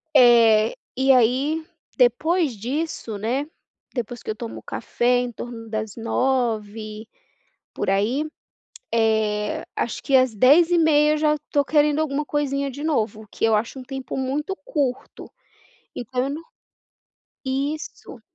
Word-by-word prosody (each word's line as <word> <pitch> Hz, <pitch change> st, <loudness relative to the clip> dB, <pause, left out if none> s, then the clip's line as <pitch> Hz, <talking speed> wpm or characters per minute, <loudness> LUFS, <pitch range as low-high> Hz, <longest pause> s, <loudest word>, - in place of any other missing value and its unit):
Eh, 230 Hz, -3 st, +6 dB, 0.2 s
e 265 Hz, +1 st, +3 dB
aí, 265 Hz, +6 st, +2 dB, 0.3 s
depois 280 Hz, +4 st, +2 dB
disso, 245 Hz, -1 st, -4 dB
né. 250 Hz, +8 st, -1 dB, 0.5 s
Depois 240 Hz, 0 st, -4 dB
que -, -, -8 dB
eu 215 Hz, -, -1 dB
tomo 230 Hz, 0 st, -7 dB
café 245 Hz, +1 st, 0 dB
em 245 Hz, -1 st, -2 dB
torno 230 Hz, -1 st, -8 dB
das 215 Hz, -1 st, -4 dB
09:00 225 Hz, -3 st, -1 dB, 0.7 s
por -, -, -3 dB
aí, 220 Hz, +9 st, +1 dB, 0.7 s
eh, 220 Hz, -2 st, +1 dB
acho 235 Hz, -, -2 dB
que 275 Hz, -, -1 dB
às 255 Hz, -3 st, +3 dB
10:30 305 Hz, -, +5 dB
eu -, -, +1 dB
já 300 Hz, 0 st, +3 dB
estou 290 Hz, -1 st, -1 dB
querendo 295 Hz, +1 st, +2 dB
alguma 300 Hz, -1 st, -1 dB
coisinha 280 Hz, -1 st, -1 dB
de 285 Hz, +3 st, -8 dB
novo, 220 Hz, -8 st, -1 dB
que -, -, -3 dB
eu 225 Hz, -1 st, +4 dB
acho 230 Hz, +5 st, -1 dB
um 260 Hz, -, -7 dB
tempo 265 Hz, -1 st, -6 dB
muito 280 Hz, +7 st, -2 dB
curto, 285 Hz, -, -3 dB, 0.7 s
então 250 Hz, +1 st, -2 dB
eu 275 Hz, -, -2 dB
não 300 Hz, +3 st, -5 dB, 1.0 s
Isso. 280 Hz, +4 st, -4 dB
255 Hz, 135 wpm, -23 LUFS, 225-290 Hz, 1.0 s, Eh